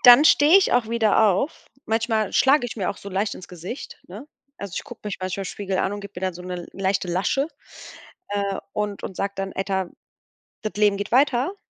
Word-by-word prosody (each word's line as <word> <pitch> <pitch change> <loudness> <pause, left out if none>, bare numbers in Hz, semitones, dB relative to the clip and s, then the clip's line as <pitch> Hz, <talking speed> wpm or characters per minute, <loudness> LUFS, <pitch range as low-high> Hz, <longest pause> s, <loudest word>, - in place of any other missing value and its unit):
dann 245 +4 +10
stehe 310 +3 +7
ich 390 - +1
auch 245 -3 +2
wieder 225 -2 +3
auf. 200 - -1 0.2
Manchmal 220 -1 0
schlage 270 -1 +4
ich 235 - -7
mir 190 -4 -1
auch - - -7
so 200 - -9
leicht 200 +2 -1
ins 180 - -11
Gesicht, 180 - -8
ne? 210 +11 -9 0.3
Also, 200 -3 -6
ich - - -3
guck - - -11
mich 205 - -3
manchmal 185 +1 -3
Spiegel 190 -1 -3
an 195 - +1
und 205 - -5
gib 200 0 -10
mir 180 - -7
dann 185 -2 -1
so 180 - -9
'ne 180 -1 -5
leichte 195 -1 -1
Lasche, 200 - 0 0.8
äh, 200 -1 -1
und 210 -1 -3
und 190 - -6
sag 200 0 -2
dann: 195 0 -3
„Alter 190 -1 -1 0.7
das 215 - -3
Leben 205 -1 +3
geht 205 +2 -4
weiter!“ 270 +6 +3
200 Hz, 210 wpm, -24 LUFS, 190-235 Hz, 0.8 s, dann